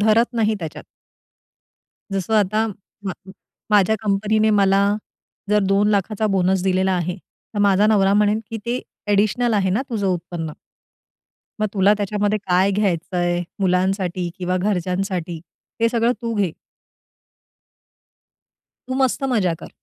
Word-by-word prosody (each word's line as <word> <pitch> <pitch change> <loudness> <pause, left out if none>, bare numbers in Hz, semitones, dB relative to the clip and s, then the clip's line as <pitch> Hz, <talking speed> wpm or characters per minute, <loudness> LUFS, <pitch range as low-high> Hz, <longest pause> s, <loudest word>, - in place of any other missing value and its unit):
धरत 220 +3 +4
नाही 220 -1 +2
त्याच्यात. 160 -3 -7 1.3
जसं 195 +3 -1
आता 215 +1 +2 0.4
म - - 0 0.6
माझ्या 210 0 +4
कंपनीने 215 +2 +2
मला 195 -1 +4 0.7
जर 210 - +4
2 205 +1 +3
लाखाचा 210 +2 0
बोनस 185 0 +2
दिलेला 190 0 +1
आहे. 180 +1 -1 0.4
तर - - -2
माझा 200 +2 +4
नवरा 200 -2 +4
म्हणेल 210 +1 +3
की 225 - -3
"ते 245 +2 -1 0.3
ॲडिशनल 215 +3 +2
आहे 190 -2 +2
ना 210 +8 +1
तुझं 205 -4 -1
उत्पन्न." 170 -3 -3 1.1
मग 215 - +2
तुला 200 +1 +4
त्याच्यामध्ये 205 +1 0
काय 190 0 +2
घ्यायचंय, 175 -3 0 0.2
मुलांसाठी 185 -1 0
किंवा 180 0 -1
घरच्यांसाठी 180 -3 -2 0.4
हे 230 - +4
सगळं 235 +1 +2
तू 230 - -2
घे. 195 -6 0 2.4
तू 255 - -2
मस्त 265 +2 -1
मज्जा 185 -7 +2
कर. - - -8
195 Hz, 125 wpm, -21 LUFS, 185-215 Hz, 2.4 s, धरत